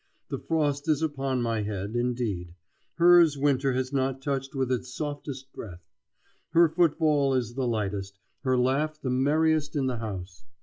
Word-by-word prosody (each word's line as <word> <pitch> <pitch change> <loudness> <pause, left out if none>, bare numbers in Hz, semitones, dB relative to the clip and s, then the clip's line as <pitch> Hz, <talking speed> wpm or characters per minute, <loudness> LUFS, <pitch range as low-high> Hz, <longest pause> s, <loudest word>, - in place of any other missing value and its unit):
The - - -3
frost 145 -2 -1
is 155 0 +2
upon 135 -4 -1
my 115 -2 0
head, 100 +1 -4
indeed; 115 -8 -2 0.4
hers 170 -3 +6
winter 135 -1 +2
has 130 +1 -2
not 135 -1 0
touched 135 0 -3
with 130 -1 0
its 125 0 -2
softest 140 -2 -6
breath. 90 -5 -9 0.7
Her 170 0 +6
footfall 155 -4 +2
is 120 -2 -1
the 130 0 -1
lightest, 100 -3 -2 0.2
her 130 -2 +1
laugh 145 +5 +1
the 130 - -2
merriest 155 +3 +2
in 140 -2 +1
the 130 -2 -1
house. 95 -5 -6
130 Hz, 160 wpm, -27 LUFS, 120-145 Hz, 0.7 s, hers